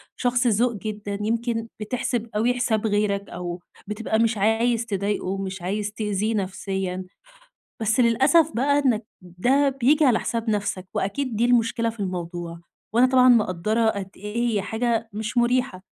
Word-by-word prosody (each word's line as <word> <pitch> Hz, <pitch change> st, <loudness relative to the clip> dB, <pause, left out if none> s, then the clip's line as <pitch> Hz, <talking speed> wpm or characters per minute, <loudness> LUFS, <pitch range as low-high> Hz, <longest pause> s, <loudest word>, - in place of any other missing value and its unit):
شخص 245 Hz, 0 st, +1 dB
ذوق 235 Hz, +2 st, +2 dB
جدًا، 205 Hz, -1 st, -5 dB
يمكن 230 Hz, +1 st, -1 dB
بتحسب 235 Hz, +1 st, -2 dB
أوي 235 Hz, +4 st, +2 dB
حساب 225 Hz, -3 st, 0 dB
غيرك، 205 Hz, -1 st, 0 dB
أو 175 Hz, 0 st, -5 dB, 0.3 s
بتبقى 220 Hz, +1 st, -1 dB
مش 230 Hz, -1 st, +2 dB
عايز 230 Hz, +3 st, +2 dB
تضايقه 200 Hz, -1 st, -2 dB
ومش 190 Hz, 0 st, -4 dB
عايز 205 Hz, +3 st, -2 dB
تأذيه 210 Hz, 0 st, -1 dB
نفسيًا. 190 Hz, -1 st, -3 dB, 0.8 s
بس 220 Hz, +3 st, +1 dB
للأسف 270 Hz, +7 st, +4 dB
بقى 285 Hz, +4 st, +2 dB
إنّك 230 Hz, -3 st, +2 dB, 0.2 s
ده 245 Hz, +11 st, +1 dB
بييجي 275 Hz, +3 st, +3 dB
على 240 Hz, -4 st, +4 dB
حساب 230 Hz, -1 st, -2 dB
نفسك، 200 Hz, -3 st, -2 dB
وأكيد 225 Hz, +5 st, -2 dB
دي 235 Hz, +3 st, +2 dB
المشكلة 230 Hz, -1 st, +2 dB
في 225 Hz, -1 st, -10 dB
الموضوع، 175 Hz, -2 st, -4 dB, 0.3 s
وأنا 240 Hz, +2 st, +5 dB
طبعًا 255 Hz, -1 st, +5 dB
مقدرة 220 Hz, 0 st, +2 dB
قد 200 Hz, -3 st, -4 dB
إيه 230 Hz, +4 st, -2 dB
هي 205 Hz, -, +1 dB
حاجة 225 Hz, +2 st, -1 dB
مش 215 Hz, +3 st, -4 dB
مريحة. 240 Hz, -5 st, +1 dB
220 Hz, 150 wpm, -24 LUFS, 200-240 Hz, 0.8 s, وأنا